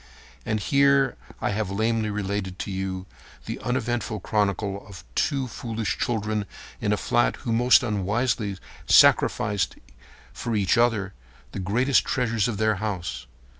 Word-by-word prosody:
And 110 Hz, -1 st, 0 dB
here 140 Hz, +2 st, +3 dB, 0.3 s
I -, -, 0 dB
have 105 Hz, -1 st, -2 dB
lamely 110 Hz, +2 st, 0 dB
related 100 Hz, -2 st, -3 dB
to 100 Hz, -, -4 dB
you 95 Hz, -1 st, -3 dB, 0.4 s
the -, -, -5 dB
uneventful 120 Hz, -3 st, -2 dB
chronicle 100 Hz, -1 st, -1 dB
of 100 Hz, -3 st, -11 dB
two 135 Hz, -, 0 dB
foolish 115 Hz, -2 st, -3 dB
children 110 Hz, -3 st, -1 dB, 0.3 s
in -, -, 0 dB
a -, -, +2 dB
flat -, -, +1 dB
who 115 Hz, -, 0 dB
most 120 Hz, +2 st, +5 dB
unwisely 105 Hz, 0 st, -1 dB, 0.3 s
sacrificed 100 Hz, -2 st, +4 dB, 0.6 s
for 115 Hz, -2 st, -3 dB
each 100 Hz, -3 st, +2 dB
other 115 Hz, -5 st, +2 dB, 0.4 s
the -, -, -5 dB
greatest 120 Hz, +9 st, +2 dB
treasures 115 Hz, -5 st, 0 dB
of 115 Hz, -4 st, -3 dB
their 110 Hz, -1 st, +2 dB
house. 90 Hz, -, -4 dB
110 Hz, 135 wpm, -25 LUFS, 100-120 Hz, 0.6 s, most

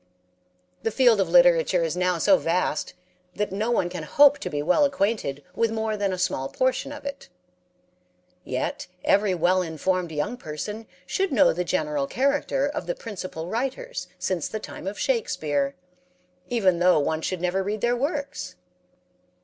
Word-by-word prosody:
The -, -, 0 dB
field 235 Hz, -3 st, +4 dB
of 185 Hz, -, 0 dB
literature 175 Hz, 0 st, +5 dB
is 165 Hz, 0 st, -1 dB
now 180 Hz, -1 st, +1 dB
so 285 Hz, -, +5 dB
vast 175 Hz, +2 st, -1 dB, 0.4 s
that 210 Hz, -1 st, -2 dB
no 210 Hz, +4 st, -1 dB
one 230 Hz, -7 st, +2 dB
can 175 Hz, -1 st, -6 dB
hope 285 Hz, -, +5 dB
to -, -, -4 dB
be 145 Hz, -1 st, -2 dB
well 180 Hz, -, +3 dB
acquainted 205 Hz, -, 0 dB
with 230 Hz, -1 st, +1 dB
more 220 Hz, -1 st, -1 dB
than 200 Hz, -2 st, -1 dB
a 185 Hz, -, -2 dB
small 135 Hz, -7 st, -1 dB
portion 260 Hz, +2 st, 0 dB
of 290 Hz, -1 st, -9 dB
it. 280 Hz, 0 st, -6 dB, 1.1 s
Yet -, -, -3 dB, 0.2 s
every 200 Hz, -2 st, +3 dB
well 180 Hz, +2 st, +3 dB
informed 175 Hz, +1 st, -1 dB
young 155 Hz, +11 st, -2 dB
person 210 Hz, +5 st, -6 dB, 0.2 s
should 385 Hz, -, -1 dB
know 275 Hz, 0 st, +5 dB
the 180 Hz, +2 st, -1 dB
general 150 Hz, -5 st, -1 dB
character 275 Hz, -, +1 dB
of 290 Hz, -, -4 dB
the -, -, -1 dB
principal 185 Hz, -, -6 dB
writers 270 Hz, -, -3 dB
since 180 Hz, -4 st, -1 dB
the 215 Hz, -, -4 dB
time 190 Hz, -, -8 dB
of 200 Hz, -, -4 dB
Shakespere, 155 Hz, -, 0 dB, 0.7 s
even 190 Hz, -8 st, +2 dB
though 180 Hz, -1 st, +5 dB
one 155 Hz, +2 st, 0 dB
should 185 Hz, +2 st, -2 dB
never 180 Hz, +2 st, 0 dB
read 205 Hz, +2 st, -3 dB
their 240 Hz, 0 st, +2 dB
works. 285 Hz, +2 st, -3 dB
195 Hz, 165 wpm, -25 LUFS, 170-245 Hz, 1.1 s, literature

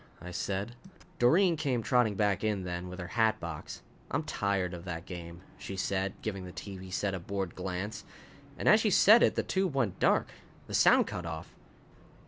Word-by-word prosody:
I 90 Hz, -, -8 dB
said. 100 Hz, +5 st, -3 dB, 0.4 s
Doreen 170 Hz, +8 st, +5 dB
came 135 Hz, -7 st, -1 dB
trotting 120 Hz, -5 st, +2 dB
back 100 Hz, 0 st, +1 dB
in 105 Hz, -3 st, 0 dB
then, 90 Hz, 0 st, -4 dB
with 90 Hz, -, -8 dB
her 90 Hz, 0 st, -6 dB
hat 110 Hz, -1 st, +2 dB
box. 85 Hz, -3 st, -7 dB, 0.3 s
"I'm -, -, -1 dB
tired 95 Hz, -3 st, -1 dB
of 85 Hz, -1 st, -7 dB
that 85 Hz, -1 st, -5 dB
game," 85 Hz, -1 st, -8 dB, 0.2 s
she 95 Hz, -, -6 dB
said, 95 Hz, 0 st, -1 dB
giving 100 Hz, -3 st, -3 dB
the 90 Hz, -, -8 dB
TV 95 Hz, -1 st, -8 dB
set 100 Hz, +1 st, -1 dB
a 95 Hz, -, -3 dB
bored 95 Hz, 0 st, -4 dB
glance. 95 Hz, +3 st, -4 dB, 0.5 s
And -, -, -3 dB
as 215 Hz, -, +7 dB
she 220 Hz, -, +2 dB
said 215 Hz, +4 st, +7 dB
it -, -, +4 dB
the -, -, 0 dB
tube 190 Hz, -6 st, -1 dB
went 120 Hz, -9 st, 0 dB
dark. -, -, +2 dB, 0.3 s
The -, -, -9 dB
sound -, -, +5 dB
cut 90 Hz, -1 st, -5 dB
off. 80 Hz, -1 st, -7 dB
95 Hz, 190 wpm, -30 LUFS, 90-115 Hz, 0.5 s, as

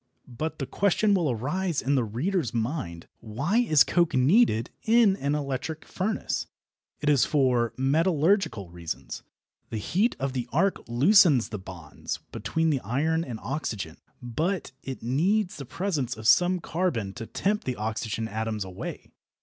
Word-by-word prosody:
But 155 Hz, +6 st, -4 dB
the 135 Hz, -, -3 dB
question 200 Hz, +6 st, +2 dB
will 175 Hz, -6 st, +2 dB
arise 150 Hz, -, -1 dB
in 140 Hz, -, 0 dB
the 130 Hz, -3 st, +3 dB
reader's 125 Hz, -, -1 dB
mind: 110 Hz, -, -3 dB
Why 140 Hz, -, -1 dB
is 155 Hz, -, +5 dB
coke 170 Hz, -5 st, +1 dB
needed 130 Hz, -, +3 dB
in 225 Hz, -3 st, +4 dB
an 140 Hz, -2 st, 0 dB
electric 145 Hz, +2 st, -4 dB
furnace? 205 Hz, +4 st, -2 dB, 0.5 s
It 150 Hz, -, -3 dB
is 145 Hz, -4 st, +5 dB
for 125 Hz, -5 st, +2 dB
metallurgical 155 Hz, -, +1 dB
reasons. 85 Hz, -2 st, -6 dB, 0.5 s
The 110 Hz, -, -3 dB
heat 195 Hz, -, +1 dB
of 135 Hz, 0 st, -2 dB
the 125 Hz, -2 st, -3 dB
arc 190 Hz, +6 st, +2 dB
loosens 145 Hz, -, +5 dB
the 105 Hz, -, -5 dB
bonds 90 Hz, -5 st, -7 dB
between 160 Hz, 0 st, 0 dB
the 140 Hz, -, +1 dB
iron 155 Hz, +9 st, 0 dB
and 120 Hz, -7 st, -6 dB
oxygen, 110 Hz, -, -4 dB, 0.3 s
but 160 Hz, -, -2 dB
it 135 Hz, -3 st, -7 dB
needs 180 Hz, -, +1 dB
the 140 Hz, -, -7 dB
presence 140 Hz, -, -2 dB
of 110 Hz, 0 st, -3 dB
some 180 Hz, +10 st, +5 dB
carbon 150 Hz, -, -1 dB
to 115 Hz, -1 st, -7 dB
tempt 210 Hz, +2 st, -1 dB
the 130 Hz, -, -2 dB
oxygen 110 Hz, +1 st, -3 dB
atoms 110 Hz, -1 st, -3 dB
away. 95 Hz, -1 st, -7 dB
140 Hz, 150 wpm, -27 LUFS, 115-175 Hz, 0.5 s, is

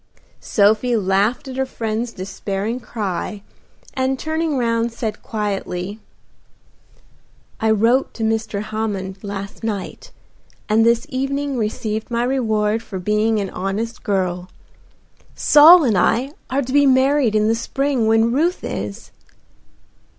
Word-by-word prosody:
Sophie 220 Hz, +4 st, +2 dB
laughed 205 Hz, +6 st, +1 dB
at 260 Hz, 0 st, -7 dB
her 265 Hz, -, +1 dB
friend's 225 Hz, -1 st, -3 dB
despairing 195 Hz, +4 st, -4 dB
cry, 205 Hz, -3 st, -4 dB, 0.5 s
and 265 Hz, 0 st, 0 dB
turning 315 Hz, 0 st, -1 dB
round 230 Hz, -1 st, 0 dB
said 220 Hz, -2 st, -4 dB
quietly, 205 Hz, -2 st, -4 dB, 1.6 s
"I 220 Hz, -, +1 dB
wrote 230 Hz, +5 st, +3 dB
to 225 Hz, -, -4 dB
Mr. 220 Hz, -2 st, -1 dB
Hammond 205 Hz, -3 st, -4 dB
last 200 Hz, +1 st, -6 dB
night, 205 Hz, -4 st, -5 dB, 0.6 s
and 220 Hz, +1 st, +3 dB
this 235 Hz, 0 st, +3 dB
evening 275 Hz, +2 st, -2 dB
received 220 Hz, -1 st, -3 dB
my 235 Hz, 0 st, 0 dB
reward 220 Hz, -4 st, 0 dB
for 195 Hz, -, -7 dB
being 210 Hz, +3 st, +1 dB
an 195 Hz, -2 st, -3 dB
honest 215 Hz, +5 st, -3 dB
girl. 185 Hz, -3 st, -1 dB, 0.9 s
Saul 320 Hz, +4 st, +8 dB
and 230 Hz, -6 st, +2 dB
I 250 Hz, +8 st, +2 dB, 0.2 s
are 270 Hz, +2 st, 0 dB
to 255 Hz, +1 st, -5 dB
be 285 Hz, 0 st, +5 dB
married 260 Hz, -3 st, +3 dB
in 215 Hz, 0 st, +3 dB
the 225 Hz, -, +3 dB
spring 265 Hz, 0 st, -1 dB
when 225 Hz, +1 st, +3 dB
Ruth 335 Hz, +7 st, 0 dB
is." 100 Hz, 0 st, -5 dB
225 Hz, 130 wpm, -20 LUFS, 205-255 Hz, 1.6 s, Saul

